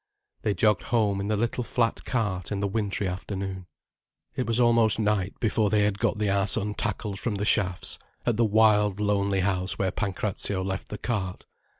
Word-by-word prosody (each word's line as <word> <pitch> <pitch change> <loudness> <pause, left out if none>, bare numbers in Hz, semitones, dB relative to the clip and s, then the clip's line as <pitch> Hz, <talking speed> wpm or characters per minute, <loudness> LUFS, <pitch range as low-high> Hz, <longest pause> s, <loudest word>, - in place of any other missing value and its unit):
They 105 - 0
jogged 105 -4 +3
home 105 -4 +1
in 100 - -3
the 105 0 0
little 120 +3 -1
flat 115 0 -1
cart 100 -7 -2
in 100 - -1
the 100 - 0
wintry 100 -1 -1
afternoon. 95 0 -5 0.7
It 130 - -2
was 115 +1 +2
almost 115 -2 +4
night 105 -3 0
before 110 -2 +1
they 105 0 +3
had 105 -1 0
got - - +1
the 105 0 0
ass 100 0 +2
untackled 105 -1 -2
from 110 -1 -2
the 100 +1 -2
shafts, 90 -6 0 0.3
at 120 - +2
the 115 - +2
wild 105 -2 +3
lonely 100 -2 +1
house 95 -1 -1
where 95 -2 0
Pancrazio 100 -1 -1
left 95 0 -4
the 105 - -5
cart. 100 -6 -3
105 Hz, 185 wpm, -26 LUFS, 95-110 Hz, 0.7 s, almost